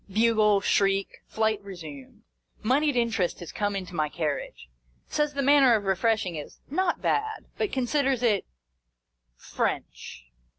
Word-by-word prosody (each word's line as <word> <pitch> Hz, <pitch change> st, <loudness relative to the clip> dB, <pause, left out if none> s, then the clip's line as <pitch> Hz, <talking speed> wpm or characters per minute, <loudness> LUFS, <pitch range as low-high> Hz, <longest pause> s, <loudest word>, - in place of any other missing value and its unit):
Bugle, 215 Hz, -1 st, +3 dB
shriek, 195 Hz, 0 st, +1 dB
flight 220 Hz, -1 st, 0 dB
resumed. 160 Hz, -9 st, -10 dB, 0.4 s
Monied 280 Hz, +5 st, +2 dB
In 235 Hz, -1 st, +2 dB
terest 180 Hz, -5 st, -1 dB
has 175 Hz, -, -8 dB
come 205 Hz, -1 st, -1 dB
into 185 Hz, -2 st, -5 dB
my 155 Hz, -3 st, 0 dB
carriage. 150 Hz, -, -4 dB, 0.4 s
Says 295 Hz, -1 st, -1 dB
the 280 Hz, -, 0 dB
manner 275 Hz, -3 st, +6 dB
of 210 Hz, -, -1 dB
refreshing 195 Hz, -1 st, +1 dB
is 150 Hz, -, -8 dB
" -, -, -29 dB
not 360 Hz, -2 st, -1 dB
bad," 435 Hz, 0 st, -1 dB
but 425 Hz, -, 0 dB
con 260 Hz, -2 st, 0 dB
siders 270 Hz, -2 st, +1 dB
it 210 Hz, -5 st, +2 dB, 0.9 s
French. 60 Hz, -, -4 dB
215 Hz, 145 wpm, -27 LUFS, 190-260 Hz, 0.9 s, manner